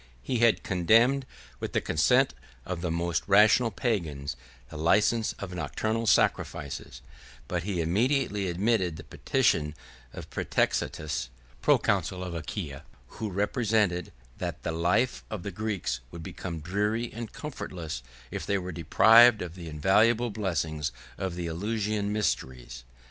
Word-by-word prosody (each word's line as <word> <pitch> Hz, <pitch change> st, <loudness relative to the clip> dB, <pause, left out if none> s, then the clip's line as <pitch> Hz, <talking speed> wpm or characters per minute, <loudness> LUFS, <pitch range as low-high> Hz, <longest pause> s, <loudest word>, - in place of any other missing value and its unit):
He 125 Hz, -, -1 dB
had 115 Hz, -1 st, +4 dB
condemned, 115 Hz, +9 st, +3 dB, 0.3 s
with -, -, -5 dB
the -, -, +3 dB
consent 125 Hz, -, +3 dB, 0.3 s
of 90 Hz, -2 st, -4 dB
the 90 Hz, -, -1 dB
most 85 Hz, -2 st, 0 dB
rational 105 Hz, +4 st, +6 dB
Pagans, 85 Hz, -, -2 dB, 0.4 s
the -, -, -9 dB
license 105 Hz, +8 st, +2 dB
of 95 Hz, -2 st, -7 dB
nocturnal 110 Hz, +5 st, -2 dB
sacrifices; 70 Hz, -7 st, 0 dB, 0.4 s
but 90 Hz, -2 st, -1 dB
he 90 Hz, -1 st, -2 dB
immediately 105 Hz, -, +1 dB
admitted 90 Hz, -1 st, +1 dB
the 80 Hz, -, -9 dB
petition 75 Hz, +1 st, 0 dB, 0.4 s
of -, -, -9 dB
Prætextatus, 75 Hz, -5 st, -1 dB, 0.3 s
proconsul 90 Hz, 0 st, +2 dB
of 90 Hz, -2 st, -5 dB
Achaia, 80 Hz, -3 st, -5 dB, 0.4 s
who 110 Hz, -, -2 dB
represented, 105 Hz, -2 st, 0 dB, 0.3 s
that -, -, -4 dB
the -, -, -1 dB
life 90 Hz, +10 st, +1 dB
of 105 Hz, -5 st, -5 dB
the 100 Hz, -, -4 dB
Greeks 100 Hz, -, -2 dB
would 85 Hz, +2 st, -9 dB
become 85 Hz, -2 st, -6 dB
dreary 105 Hz, +7 st, -1 dB
and 115 Hz, -1 st, -6 dB
comfortless, 85 Hz, -, -6 dB, 0.3 s
if -, -, -4 dB
they 100 Hz, -, 0 dB
were 90 Hz, -1 st, -4 dB
deprived 110 Hz, +7 st, +6 dB
of 85 Hz, -2 st, -7 dB
the 85 Hz, -2 st, -8 dB
invaluable 110 Hz, +9 st, +3 dB
blessing 80 Hz, -7 st, -2 dB, 0.4 s
of 95 Hz, -2 st, -3 dB
the 90 Hz, -1 st, -4 dB
Eleusinian 105 Hz, +4 st, -1 dB
mysteries. 65 Hz, -, -2 dB
95 Hz, 135 wpm, -28 LUFS, 80-110 Hz, 0.4 s, rational